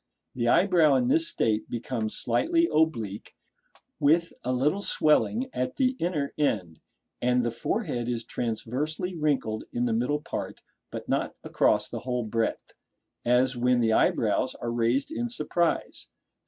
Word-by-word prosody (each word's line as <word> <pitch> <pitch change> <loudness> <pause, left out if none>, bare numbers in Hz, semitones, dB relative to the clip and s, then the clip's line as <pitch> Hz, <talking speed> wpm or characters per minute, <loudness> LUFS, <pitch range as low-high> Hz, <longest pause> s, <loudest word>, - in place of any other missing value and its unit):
The 120 -1 -1
eyebrow 165 0 +4
in 125 -1 +2
this 165 +4 +4
state 110 -1 0
becomes 115 -2 -3
slightly 335 +2 +2
oblique, 115 -11 0 0.6
with 165 +4 +3
a 125 - -1
little 145 +10 +1
swelling 210 - +2
at 125 - -2
the 260 -1 +1
Inner 155 -5 -1
end; 90 - -1 0.4
and 125 0 +2
the 120 - 0
forehead 120 - -2
is 120 -1 -2
transversely 140 - -3
wrinkled 140 -9 -1
in 120 0 -1
the 115 - 0
middle 125 +6 0
part, - - -6 0.3
but - - -7
not - - -1
across - - +2
the - - -5
whole 125 -1 -2
breadth, 115 +1 -2 0.5
as 125 +2 +3
when 125 0 +2
the 115 -2 +2
eyebrows - - +2
are 120 - -4
raised 120 - 0
in 240 -6 -2
surprise. 175 -8 -1
125 Hz, 145 wpm, -27 LUFS, 120-160 Hz, 0.6 s, eyebrow